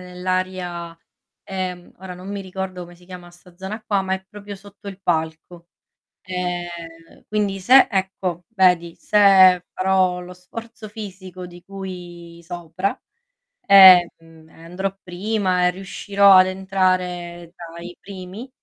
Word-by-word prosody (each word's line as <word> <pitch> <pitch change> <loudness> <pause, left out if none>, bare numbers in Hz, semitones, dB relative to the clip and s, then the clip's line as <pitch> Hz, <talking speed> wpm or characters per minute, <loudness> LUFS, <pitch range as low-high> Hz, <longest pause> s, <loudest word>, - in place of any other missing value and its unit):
nell'aria, 180 -2 -4 0.4
ehm, 185 -2 -6
ora 185 0 -9
non 185 +2 -9
mi 200 0 -4
ricordo 190 -1 -6
come 175 0 -10
si 175 +1 -21
chiama 180 -1 -11
sta 175 0 -18
zona 195 +4 -7
qua, 200 -2 +1
ma 190 0 -1
è 190 - -8
proprio 205 0 -10
sotto 200 +1 -13
il 195 - -9
palco. 165 +1 -3 0.5
Ehm, 175 -2 -6
quindi 205 -2 -1
se 260 +8 +6
ecco 190 -3 -3
vedi 180 -6 +2
se 190 -3 +5
farò 185 -1 +1
lo 180 0 -10
sforzo 220 +5 -10
fisico 190 -4 -9
di 175 0 -12
cui 175 -3 -9
sopra 175 +2 -4 0.6
e, 190 -3 +8
mhmm, 160 -1 -19
ehm, - - -21
andrò 190 +3 -4
prima 185 0 -1
e - - +2
riuscirò 195 +2 +2
ad 185 - +7
entrare 185 -2 -2
tra 170 -1 -11
i 175 0 -10
primi, 195 +5 -10
185 Hz, 140 wpm, -21 LUFS, 175-195 Hz, 0.6 s, e